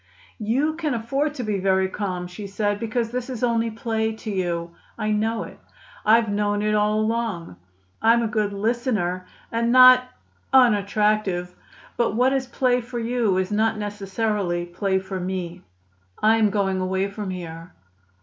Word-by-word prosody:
"You 260 Hz, +9 st, +1 dB
can 305 Hz, -6 st, -1 dB
afford 275 Hz, +6 st, -1 dB
to 250 Hz, -, -4 dB
be 210 Hz, -3 st, -1 dB
very 190 Hz, 0 st, +2 dB
calm," 185 Hz, -2 st, -4 dB
she 190 Hz, +3 st, -8 dB
said, 205 Hz, +1 st, -1 dB
"because 230 Hz, +1 st, -2 dB
this 250 Hz, +1 st, -4 dB
is 250 Hz, -2 st, -5 dB
only 230 Hz, -1 st, +1 dB
play 220 Hz, 0 st, -2 dB
to 220 Hz, 0 st, -6 dB
you; 175 Hz, -3 st, -2 dB, 0.3 s
I 215 Hz, -1 st, -1 dB
know 220 Hz, +2 st, 0 dB
it. -, -, -11 dB, 0.4 s
I've 225 Hz, +1 st, +4 dB
known 205 Hz, 0 st, 0 dB
it 215 Hz, 0 st, +1 dB
all 210 Hz, 0 st, +2 dB
along. 215 Hz, -, -2 dB, 0.4 s
I'm 230 Hz, +1 st, +4 dB
a -, -, +1 dB
good 210 Hz, -1 st, 0 dB
listener 200 Hz, -4 st, -1 dB, 0.2 s
and 235 Hz, +1 st, 0 dB
not 255 Hz, 0 st, +8 dB, 0.4 s
unattractive. 210 Hz, -6 st, +2 dB, 0.4 s
But 235 Hz, -3 st, +1 dB
what 255 Hz, +3 st, +3 dB
is 265 Hz, -1 st, -1 dB
play 250 Hz, -1 st, +1 dB
for 240 Hz, +1 st, -7 dB
you 230 Hz, -4 st, 0 dB
is 185 Hz, +1 st, -1 dB
not 220 Hz, +1 st, +1 dB
necessarily 205 Hz, -3 st, -2 dB
play 190 Hz, +2 st, -1 dB
for 190 Hz, 0 st, -4 dB
me. 180 Hz, -1 st, -4 dB, 0.6 s
I 220 Hz, +1 st, +4 dB
am 215 Hz, -2 st, +3 dB
going 195 Hz, -2 st, 0 dB
away 190 Hz, +1 st, 0 dB
from 200 Hz, 0 st, -6 dB
here." 170 Hz, -1 st, -7 dB
215 Hz, 160 wpm, -23 LUFS, 190-230 Hz, 0.6 s, not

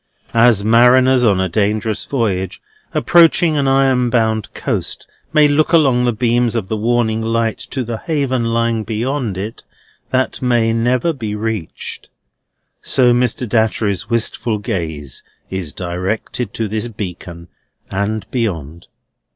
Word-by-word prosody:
As 115 Hz, -3 st, +4 dB
mariners 125 Hz, +3 st, +5 dB
on 100 Hz, -5 st, +3 dB
a 95 Hz, -, +1 dB
dangerous 105 Hz, +3 st, -1 dB
voyage, 100 Hz, -8 st, -2 dB, 0.3 s
approaching 170 Hz, -1 st, +4 dB
an 140 Hz, -2 st, +1 dB
iron 135 Hz, -2 st, +3 dB
bound 110 Hz, -3 st, 0 dB
coast, -, -, -3 dB, 0.2 s
may 150 Hz, -1 st, +5 dB
look 150 Hz, +3 st, +1 dB
along 135 Hz, -7 st, +4 dB
the 120 Hz, -, +2 dB
beams 120 Hz, +1 st, +1 dB
of 105 Hz, -5 st, -2 dB
the 110 Hz, -, -1 dB
warning 115 Hz, 0 st, 0 dB
light 115 Hz, 0 st, -1 dB
to 130 Hz, -, -4 dB
the 115 Hz, -1 st, -4 dB
haven 140 Hz, -7 st, -1 dB
lying 115 Hz, -1 st, 0 dB
beyond 115 Hz, 0 st, -2 dB
it 105 Hz, +4 st, -6 dB, 0.5 s
that 130 Hz, 0 st, -1 dB
may 120 Hz, -3 st, +2 dB
never 125 Hz, +8 st, +1 dB
be 110 Hz, -7 st, -4 dB
reached, 105 Hz, -5 st, -5 dB, 0.7 s
so 125 Hz, -2 st, +3 dB
Mr. 125 Hz, 0 st, 0 dB
Datchery's 110 Hz, -3 st, 0 dB
wistful 115 Hz, -1 st, 0 dB
gaze 80 Hz, -, -4 dB, 0.3 s
is 95 Hz, -5 st, -3 dB
directed 95 Hz, -, -3 dB
to 115 Hz, -, -1 dB
this 110 Hz, +3 st, -2 dB
beacon, 90 Hz, -5 st, -7 dB, 0.4 s
and 100 Hz, +2 st, -2 dB
beyond. 85 Hz, -, -3 dB
115 Hz, 135 wpm, -17 LUFS, 105-125 Hz, 0.7 s, mariners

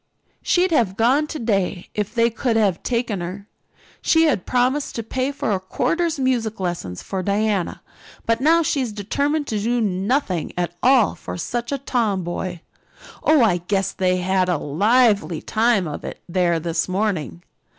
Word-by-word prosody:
She'd 365 Hz, 0 st, +2 dB
have 220 Hz, -, +1 dB
gone 265 Hz, +7 st, +3 dB
today 205 Hz, -, -1 dB
if 210 Hz, +2 st, -3 dB
they 230 Hz, 0 st, +3 dB
could 230 Hz, +1 st, -1 dB
have 200 Hz, -6 st, +2 dB
taken 235 Hz, -6 st, -1 dB
her. 190 Hz, +4 st, -6 dB, 0.5 s
She 325 Hz, 0 st, +4 dB
had 285 Hz, -, +1 dB
promised 255 Hz, +3 st, +1 dB
to 230 Hz, -, -3 dB
pay 260 Hz, +4 st, -2 dB
for 280 Hz, -5 st, -2 dB
a 195 Hz, -, +1 dB
quarter's 315 Hz, -, -1 dB
music 240 Hz, -5 st, 0 dB
lessons 170 Hz, -, -4 dB
for 190 Hz, -1 st, -3 dB
Diana, 200 Hz, -1 st, -1 dB, 0.4 s
but 230 Hz, +1 st, +1 dB
now 330 Hz, +4 st, +4 dB
she 290 Hz, -2 st, 0 dB
is 240 Hz, -4 st, -3 dB
determined 285 Hz, +9 st, -1 dB
to 215 Hz, -6 st, -2 dB
do 235 Hz, +4 st, 0 dB
nothing 195 Hz, -, -1 dB
at 175 Hz, -1 st, -1 dB
all 255 Hz, -4 st, +4 dB
for -, -, -7 dB
such 240 Hz, +8 st, -3 dB
a 280 Hz, -, 0 dB
tomboy. 190 Hz, -9 st, -2 dB, 0.6 s
Oh, 310 Hz, -5 st, +4 dB
I 190 Hz, -6 st, +3 dB
guess 190 Hz, +2 st, -1 dB
they 185 Hz, -1 st, +1 dB
had 185 Hz, 0 st, +1 dB
a 175 Hz, -, +2 dB
lively 200 Hz, -, +2 dB
time 220 Hz, -5 st, +1 dB
of 150 Hz, -, -6 dB
it -, -, -7 dB
there 175 Hz, -1 st, +1 dB
this 165 Hz, +2 st, -2 dB
morning. 180 Hz, -, -2 dB
215 Hz, 165 wpm, -21 LUFS, 185-250 Hz, 0.6 s, She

